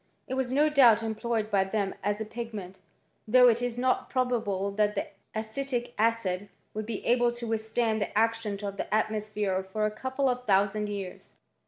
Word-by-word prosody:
It - - -4
was 260 -1 -1
no 290 +3 +4
doubt 245 -7 +6
employed 220 0 -2
by 195 -2 +4
them 195 0 -1
as 205 +1 0
a 220 - -3
pigment, 215 -5 -7 0.5
though 250 +3 +7
it 235 +1 +1
is 245 -1 -2
not 255 +1 +1
probable 220 -7 0
that 210 +1 +1
the 200 - -2 0.3
acetic 240 +2 -3
acid 210 -4 0 0.2
would 215 0 -4
be 225 -3 -4
able 240 0 +3
to 240 0 -6
withstand 220 0 0
the 200 - -2
action 225 -2 +1
of 200 0 -4
the - - -4
atmosphere 215 -3 0
for 190 +3 -2
a 215 - 0
couple 260 +5 -1
of 250 -1 -1
thousand 205 +1 +2
years. 195 -3 -7
220 Hz, 180 wpm, -28 LUFS, 205-240 Hz, 0.5 s, though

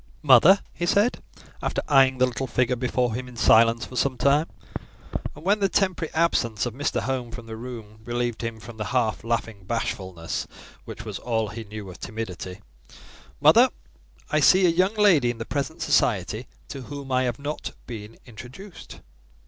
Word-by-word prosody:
"Mother," 190 +4 +7
he 175 - -3
said, 205 +6 +2 0.4
after - - -2
eyeing 135 -2 +5
the 130 - +4
little 130 +1 -3
figure 125 +1 +1
before 125 -1 0
him 125 +2 -4
in 125 - -12
silence 115 0 +4
for 130 - -11
some 130 0 0
time, 145 +5 +3 0.9
and 150 +3 -13
when 205 +2 +3
the 195 -1 +2
temporary 185 -4 0
absence 125 -10 +1
of 120 - -3
Mr. 145 +4 -1
Home 130 -3 -2
from 115 0 -9
the 110 0 -7
room 110 -3 -9
relieved 120 0 -2
him 115 -1 -4
from 115 0 -11
the 110 - -3
half 110 -4 0
laughing 115 -3 -2
bashfulness, 95 -5 -3 0.4
which - - -8
was - - -5
all 110 -3 -1
he 110 +3 -7
knew 105 -1 -8
of 90 - -13
timidity— 100 -3 -6 0.8
"Mother, - - +6 0.6
I 150 - +3
see 185 +6 +6
a - - +5
young 185 +5 +2
lady 180 - +4
in 120 - -3
the 115 - -5
present 145 +2 -3
society 105 +3 +1 0.2
to 135 - -6
whom 140 +1 -8
I 130 0 +3
have 120 -2 -2
not 145 +2 -5
been 110 -2 -8
introduced." 125 - -11
125 Hz, 175 wpm, -25 LUFS, 115-145 Hz, 0.9 s, Mother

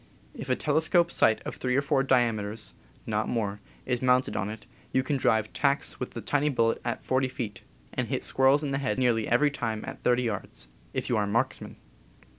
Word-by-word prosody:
If - - -8
a 130 - +3
telescope 160 +4 +2
sight 110 - +3
of - - -6
three 125 -1 0
or 140 - +4
four 140 -2 +2
diame 120 -5 +3
ters 105 +2 -4 0.3
(not 110 0 -1
more) 105 -4 -2 0.2
is 125 -2 -1
mounted 125 0 +2
on 100 0 -1
it, 110 +1 -8 0.3
you 130 - +2
can 140 +2 -1
drive 110 -4 +1
tacks 140 0 +1
with 125 - -5
the 115 - -4
tiny 145 +7 +1
bullet 115 -4 +1
at 120 - -3
40 130 0 +1
feet, 115 -6 -5 0.3
and - - -1
hit - - -2
squirrels 135 +3 +3
in 140 - -2
the 135 - 0
head 135 -1 -1
nearly 120 -4 +2
every 145 +5 +3
time 110 -5 -3
at - - -8
30 125 0 +2
yards 100 - -5
— - - -30
if - - -2
you 120 - +1
are 105 - +1
a - - -4
marks 115 +4 0
man. - - -9
125 Hz, 225 wpm, -28 LUFS, 110-135 Hz, 0.3 s, or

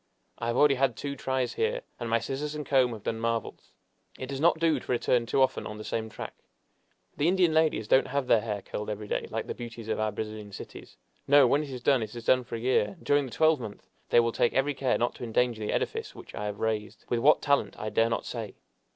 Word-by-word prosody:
I 115 - -3
have 120 +1 0
already 145 -1 +6
had 135 -2 +1
two 140 -1 -4
tries 130 -1 -1
here, 480 +2 0 0.2
and 120 -1 -4
my 115 - +3
scissors 135 +6 -4
and 150 -1 -4
comb 130 -3 +3
have 110 -2 -9
done 115 - -2
marvels! 115 0 -3 0.5
It 130 - -5
does 135 -1 -4
not 170 +1 +4
do 160 -3 +2
to - - -6
return 120 -1 +1
too 135 +3 +3
often 130 - -1
on 105 - -7
the 110 - -7
same 110 0 -3
track. 110 - -7 0.8
The 145 - +2
Indian 180 -2 +3
ladies 155 -9 +2
don't 130 - +4
have 140 0 -1
their 115 -3 +4
hair 105 -3 -4
curled 105 +1 -5
every 105 0 -5
day, - - -2
like - - -3
the - - -4
beauties 115 -2 -8
of - - -1
our 110 0 0
Brazilian 105 -1 -6
cities. - - -10 0.3
No; 145 -1 +7
when 140 +4 +3
it 150 - -6
is 125 -2 -7
done, 135 -4 +4
it 110 +1 -5
is 120 -1 -8
done 130 0 +4
for 120 -1 -6
year, 125 - +1
and - - -18
during 145 -1 +3
the - - -11
twelvemonth 145 -10 0 0.2
they - - +6
will 115 0 +2
take 115 +2 +1
every 135 +2 +2
care 130 -2 +1
not 120 - 0
to - - -8
endanger 120 -1 0
the 105 - -2
edifice - - -2
which - - -12
I 105 - -4
have 105 -1 -4
raised 110 -1 -3
with 120 - 0
what 145 +6 +4
talent 140 -1 +1
I 110 - -4
dare 115 +2 +2
not 115 - -2
say. 110 -5 -5
120 Hz, 250 wpm, -28 LUFS, 110-140 Hz, 0.8 s, No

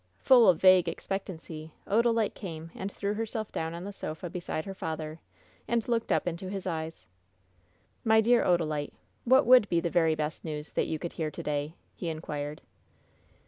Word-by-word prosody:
Full 240 - +6
of 175 - +4
vague 185 -2 +6
expectancy, 165 -5 -6
Odalite 230 0 +2
came 165 -4 -7
and 195 +1 -5
threw 200 +1 -2
herself 220 0 -3
down 160 +1 -3
on 170 - -6
the 200 +1 -6
sofa 165 -1 -6
beside 175 -3 -4
her 195 - -5
father, 160 -3 -5 0.5
and 235 -2 0
looked 230 -2 0
Uf - - +2
into 180 +2 -3
his 195 -1 -5
eyes. 160 -2 -4 1.0
"My 220 -1 +5
dear 235 +2 +4
Odalite, 155 -4 0 0.3
what 260 +3 +5
would 245 -3 +7
be 170 - +3
the 170 0 -2
very 160 -2 +3
best 155 0 -3
news 150 -1 -5
that - - 0
you 160 - -2
could 170 +2 -6
hear 160 -2 -2
to - - -8
day?" 150 +2 -2 0.2
he 175 - -4
inquired. 150 -2 -5
175 Hz, 180 wpm, -29 LUFS, 160-205 Hz, 1.0 s, would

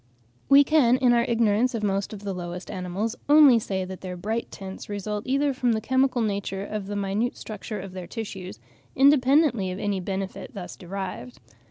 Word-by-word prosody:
We 280 +1 +8
can, 270 -5 +4
in 250 -2 +4
our 235 0 +3
ignorance 230 +1 +2
of 220 - -3
most 195 -1 -1
of 205 -2 -9
the 200 -1 -3
lowest 180 0 -6
animals, 190 +5 -3
only 290 -5 +8
say 190 -3 -3
that 185 0 -8
their 180 -1 -6
bright 220 +6 -3
tints 190 +1 -9
result 205 +1 -4
either 275 +2 +1
from 250 -2 +1
the 220 - 0
chemical 260 +1 +1
nature 200 -1 -3
or 215 - -1
the 205 +1 -6
minute 205 +4 -1
structure 215 0 -6
of 190 -1 -8
their 185 -2 -7
tissues, 195 -5 -6 0.4
independently 270 - +4
of 185 - -4
any 200 -1 -1
benefit 190 +1 -5
thus 185 -3 -7
derived. 180 -9 -7
205 Hz, 185 wpm, -25 LUFS, 190-245 Hz, 0.4 s, We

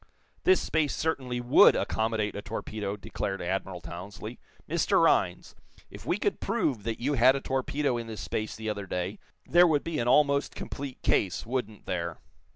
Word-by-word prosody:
"This 375 +1 +6
space 155 -3 0
certainly 130 -6 -1
would 120 +1 +6
accommodate 110 -1 -1
a 100 - -4
torpedo," 105 -2 -4
declared 95 -1 -4
Admiral 95 0 -3
Townsley. 90 +5 -8 0.3
"Mr. - - +2
Rhinds, - - +2 0.4
if - - -11
we - - +1
could - - -1
prove 120 -6 0
that 115 -1 -2
you 140 +4 0
had 130 +1 +5
a - - -1
torpedo 135 0 -1
in 115 -1 -5
this 110 -1 -6
space 110 0 -3
the 110 0 -6
other 100 -2 -3
day, 90 +2 -3 0.3
there 175 +1 +6
would 150 -3 +2
be 165 -2 -3
an 120 - -1
almost 140 +1 +3
complete 135 -2 -6
case, 95 -3 +1
wouldn't 115 -4 -4
there?" 85 -2 -3
115 Hz, 170 wpm, -28 LUFS, 100-140 Hz, 0.4 s, This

